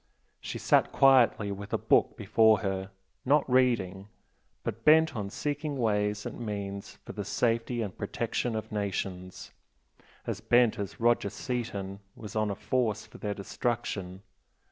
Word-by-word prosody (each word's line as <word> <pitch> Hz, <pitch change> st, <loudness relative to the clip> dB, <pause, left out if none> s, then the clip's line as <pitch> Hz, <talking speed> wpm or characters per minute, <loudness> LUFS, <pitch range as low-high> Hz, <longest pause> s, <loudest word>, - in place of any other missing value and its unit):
She -, -, -5 dB
sat -, -, +3 dB
quietly 125 Hz, -6 st, +4 dB
with 100 Hz, 0 st, -7 dB
a -, -, +3 dB
book -, -, +2 dB
before 110 Hz, -3 st, +4 dB
her, 95 Hz, -1 st, -2 dB, 0.3 s
not 145 Hz, +3 st, +3 dB
reading, 115 Hz, -7 st, +1 dB, 0.6 s
but 115 Hz, +2 st, -4 dB
bent 155 Hz, -1 st, +5 dB
on 100 Hz, -3 st, -3 dB
seeking 145 Hz, +5 st, -3 dB
ways 105 Hz, -3 st, 0 dB
and 120 Hz, -, -6 dB
means 100 Hz, -2 st, -5 dB
for -, -, -7 dB
the -, -, -4 dB
safety 115 Hz, 0 st, 0 dB
and 100 Hz, -4 st, -6 dB
protection 115 Hz, +3 st, -2 dB
of 110 Hz, 0 st, -5 dB
nations, 95 Hz, -3 st, -4 dB, 0.7 s
as -, -, -4 dB
bent 120 Hz, -3 st, +3 dB
as 100 Hz, -2 st, -5 dB
Roger 120 Hz, -3 st, +2 dB
Seaton 100 Hz, -5 st, -4 dB, 0.2 s
was 105 Hz, -2 st, -9 dB
on 110 Hz, -1 st, +1 dB
a 100 Hz, -, -2 dB
force 110 Hz, -2 st, -1 dB
for -, -, -14 dB
their 105 Hz, -1 st, -3 dB
destruction. 100 Hz, -3 st, -3 dB
110 Hz, 145 wpm, -29 LUFS, 100-120 Hz, 0.7 s, bent